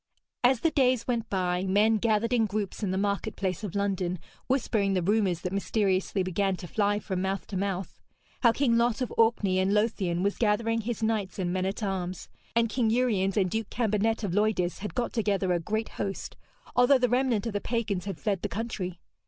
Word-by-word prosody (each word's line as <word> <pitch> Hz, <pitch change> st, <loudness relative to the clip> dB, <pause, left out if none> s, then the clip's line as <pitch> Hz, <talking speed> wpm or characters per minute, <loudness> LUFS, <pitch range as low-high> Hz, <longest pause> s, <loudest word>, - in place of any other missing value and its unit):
As 245 Hz, -1 st, +4 dB
the 330 Hz, -, +2 dB
days 255 Hz, -5 st, +2 dB
went 235 Hz, -3 st, -1 dB
by, 180 Hz, -2 st, 0 dB
men 205 Hz, +4 st, +3 dB
gathered 225 Hz, +2 st, +1 dB
in 225 Hz, -3 st, +3 dB
groups 205 Hz, 0 st, -3 dB
in 205 Hz, -, -1 dB
the 190 Hz, -, -1 dB
market 200 Hz, +2 st, -1 dB
place 190 Hz, 0 st, -2 dB
of 205 Hz, -3 st, -5 dB
London, 190 Hz, -3 st, 0 dB, 0.3 s
whispering 220 Hz, -7 st, +1 dB
the 180 Hz, -, +1 dB
rumours 195 Hz, -3 st, +1 dB
that 180 Hz, +1 st, -3 dB
mysteriously 195 Hz, -1 st, 0 dB
began 190 Hz, +1 st, 0 dB
to 175 Hz, -, -8 dB
fly 205 Hz, +2 st, +1 dB
from 190 Hz, -3 st, -3 dB
mouth 190 Hz, -2 st, -2 dB
to 200 Hz, -, -7 dB
mouth, 195 Hz, 0 st, -3 dB, 0.4 s
how 235 Hz, -, +6 dB
King 235 Hz, -1 st, +2 dB
Lot 235 Hz, +1 st, +1 dB
of 250 Hz, -, -2 dB
Orkney 220 Hz, -5 st, +3 dB
and 190 Hz, +2 st, +2 dB
Lothian 195 Hz, -5 st, 0 dB
was 200 Hz, 0 st, 0 dB
gathering 225 Hz, +1 st, +1 dB
his 225 Hz, 0 st, -4 dB
knights 215 Hz, -4 st, -1 dB
and 180 Hz, -2 st, -1 dB
men 185 Hz, 0 st, 0 dB
at 195 Hz, +3 st, -4 dB
arms; 185 Hz, -2 st, -3 dB, 0.3 s
and 230 Hz, 0 st, +4 dB
King 230 Hz, 0 st, 0 dB
Uriens 215 Hz, -5 st, +1 dB
and 190 Hz, -3 st, +3 dB
Duke 220 Hz, 0 st, -2 dB
Cambenet 225 Hz, -1 st, 0 dB
of 190 Hz, -4 st, -1 dB
Loidis 205 Hz, -4 st, +1 dB
had 210 Hz, +2 st, -6 dB
got 245 Hz, -2 st, -1 dB
together 200 Hz, -5 st, +1 dB
a 175 Hz, -, +1 dB
great 215 Hz, +6 st, -2 dB
host, 195 Hz, -1 st, -5 dB, 0.4 s
although 250 Hz, +3 st, +6 dB
the 250 Hz, -1 st, +2 dB
remnant 245 Hz, -3 st, +1 dB
of 230 Hz, -, -3 dB
the 205 Hz, -, -1 dB
pagans 215 Hz, -6 st, -2 dB
had 195 Hz, -4 st, -4 dB
fled 200 Hz, -4 st, -1 dB
the -, -, -2 dB
country. 190 Hz, -5 st, -4 dB
205 Hz, 205 wpm, -28 LUFS, 190-225 Hz, 0.4 s, how